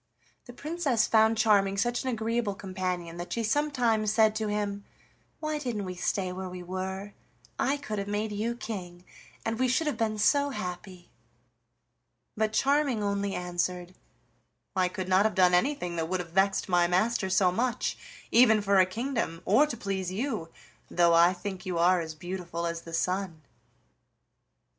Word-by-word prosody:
The 245 Hz, -, -11 dB
Princess 285 Hz, -5 st, 0 dB
found 220 Hz, 0 st, +4 dB
Charming 200 Hz, -3 st, +3 dB
such 240 Hz, +4 st, 0 dB
an 260 Hz, -, -2 dB
agreeable 230 Hz, -2 st, -1 dB
companion 185 Hz, -3 st, -4 dB
that 175 Hz, +1 st, -7 dB
she 230 Hz, -, -1 dB
sometimes 235 Hz, -4 st, +1 dB
said 220 Hz, -1 st, +4 dB
to 215 Hz, -1 st, -1 dB
him: 205 Hz, -1 st, -2 dB, 0.6 s
"Why 310 Hz, -1 st, -2 dB
didn't 235 Hz, -8 st, -3 dB
we 185 Hz, -, -4 dB
stay 185 Hz, +1 st, -1 dB
where 185 Hz, 0 st, -5 dB
we 180 Hz, 0 st, -8 dB
were? 190 Hz, +2 st, -5 dB, 0.5 s
I 280 Hz, +2 st, +1 dB
could 215 Hz, -8 st, -4 dB
have 200 Hz, -, -4 dB
made 210 Hz, +1 st, -2 dB
you 220 Hz, +3 st, -2 dB
king, 180 Hz, -6 st, -7 dB, 0.4 s
and 225 Hz, +1 st, -2 dB
we 255 Hz, -, +3 dB
should 255 Hz, +6 st, +1 dB
have 295 Hz, -6 st, -2 dB
been 215 Hz, -1 st, 0 dB
so 285 Hz, +7 st, +3 dB
happy!" 180 Hz, -5 st, -7 dB, 1.2 s
But 215 Hz, -1 st, 0 dB
Charming 275 Hz, -1 st, +2 dB
only 200 Hz, -1 st, -1 dB
answered: 180 Hz, 0 st, -3 dB, 0.8 s
"I 185 Hz, -1 st, +3 dB
could 185 Hz, 0 st, -5 dB
not 190 Hz, +1 st, +4 dB
have 215 Hz, -3 st, 0 dB
done 180 Hz, -1 st, +5 dB
anything 180 Hz, -4 st, +1 dB
that 165 Hz, 0 st, -2 dB
would 185 Hz, 0 st, 0 dB
have 170 Hz, -2 st, -6 dB
vexed 195 Hz, +2 st, +2 dB
my 175 Hz, -2 st, +3 dB
master 190 Hz, +3 st, +1 dB
so 185 Hz, -1 st, +3 dB
much, 240 Hz, +5 st, -1 dB, 0.4 s
even 230 Hz, -2 st, +6 dB
for 200 Hz, -1 st, +3 dB
a 185 Hz, -, +5 dB
kingdom, 225 Hz, -5 st, -3 dB
or 250 Hz, +10 st, +5 dB
to 240 Hz, -, -5 dB
please 190 Hz, -3 st, -3 dB
you, 215 Hz, -5 st, -3 dB, 0.4 s
though 170 Hz, -1 st, +4 dB
I 170 Hz, +1 st, +6 dB
think 185 Hz, 0 st, -6 dB
you 180 Hz, -2 st, -3 dB
are 175 Hz, +1 st, +4 dB
as 160 Hz, -1 st, -6 dB
beautiful 175 Hz, 0 st, -5 dB
as 170 Hz, 0 st, -3 dB
the 165 Hz, -, -11 dB
sun." 180 Hz, -2 st, -2 dB
200 Hz, 170 wpm, -28 LUFS, 180-225 Hz, 1.2 s, even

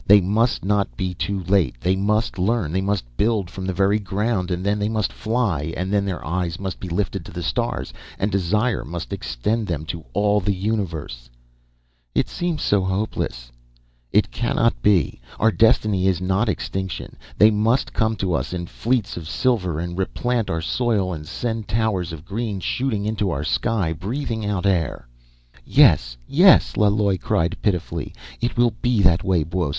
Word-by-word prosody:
"They 105 Hz, +1 st, +8 dB
must 105 Hz, +4 st, +1 dB
not 100 Hz, -1 st, 0 dB
be 95 Hz, -3 st, -2 dB
too 95 Hz, +1 st, -3 dB
late. 95 Hz, -9 st, +1 dB
They 90 Hz, +6 st, +1 dB
must 105 Hz, +1 st, 0 dB
learn. 100 Hz, -4 st, +1 dB
They 95 Hz, +3 st, 0 dB
must 100 Hz, -4 st, -1 dB
build 105 Hz, -5 st, +1 dB
from 95 Hz, -1 st, -5 dB
the -, -, 0 dB
very 100 Hz, +3 st, +2 dB
ground, 100 Hz, -1 st, -1 dB
and 90 Hz, +1 st, -2 dB
then 105 Hz, +1 st, +1 dB
they 105 Hz, +1 st, 0 dB
must 110 Hz, -3 st, -1 dB
fly. 100 Hz, -, -1 dB
And 95 Hz, +3 st, -2 dB
then 100 Hz, -1 st, +2 dB
their 95 Hz, -3 st, -4 dB
eyes 85 Hz, 0 st, -2 dB
must 95 Hz, -2 st, -4 dB
be 95 Hz, -, -6 dB
lifted 90 Hz, +4 st, -2 dB
to -, -, -11 dB
the -, -, -5 dB
stars, -, -, -2 dB, 0.2 s
and 100 Hz, +2 st, 0 dB
desire 105 Hz, +5 st, +1 dB
must 85 Hz, +5 st, -6 dB
extend 100 Hz, -, -2 dB
them 80 Hz, -3 st, -3 dB
to 80 Hz, 0 st, -5 dB
all 105 Hz, 0 st, +3 dB
the 100 Hz, 0 st, 0 dB
universe 85 Hz, -, -3 dB, 0.4 s
..." -, -, -41 dB, 0.2 s
"It -, -, +2 dB
seems 175 Hz, -3 st, -2 dB
so 100 Hz, -2 st, +2 dB
hopeless 95 Hz, -, -3 dB, 0.3 s
" -, -, -39 dB
"It -, -, -2 dB
cannot 115 Hz, 0 st, 0 dB
be! 90 Hz, -11 st, +2 dB, 0.2 s
Our 115 Hz, -, +4 dB
destiny 105 Hz, -4 st, +3 dB
is 95 Hz, -3 st, +2 dB
not 95 Hz, +5 st, +1 dB
extinction. 95 Hz, -2 st, -4 dB, 0.2 s
They 110 Hz, +1 st, +7 dB
must 110 Hz, +5 st, +1 dB
come 110 Hz, -1 st, +1 dB
to 95 Hz, -3 st, -1 dB
us, 70 Hz, +2 st, -2 dB
in 90 Hz, -1 st, -3 dB
fleets 115 Hz, +3 st, -1 dB
of 80 Hz, -2 st, -7 dB
silver, 95 Hz, -12 st, 0 dB
and 85 Hz, +1 st, -4 dB
replant 115 Hz, +5 st, -1 dB
our 80 Hz, 0 st, -1 dB
soil, 100 Hz, -1 st, 0 dB
and 75 Hz, -2 st, -7 dB
send 115 Hz, +3 st, -3 dB
towers 105 Hz, -5 st, 0 dB
of 80 Hz, 0 st, -9 dB
green 105 Hz, 0 st, -3 dB
shooting 110 Hz, 0 st, -1 dB
into 105 Hz, -2 st, 0 dB
our 70 Hz, -3 st, -2 dB
sky, 80 Hz, -, 0 dB
breathing 110 Hz, -, -3 dB
out 100 Hz, -2 st, -1 dB
air." 85 Hz, -10 st, 0 dB, 0.6 s
"Yes, -, -, +4 dB
yes!" 180 Hz, +4 st, +5 dB
Laloi 100 Hz, -2 st, +2 dB
cried 80 Hz, +1 st, 0 dB
pitifully. 90 Hz, -5 st, -2 dB, 0.3 s
"It 120 Hz, +1 st, -1 dB
will 120 Hz, -1 st, +4 dB
be 120 Hz, -4 st, +2 dB
that 85 Hz, -2 st, +4 dB
way, 90 Hz, -4 st, +2 dB
Buos. 85 Hz, 0 st, -2 dB
95 Hz, 180 wpm, -22 LUFS, 85-110 Hz, 0.6 s, They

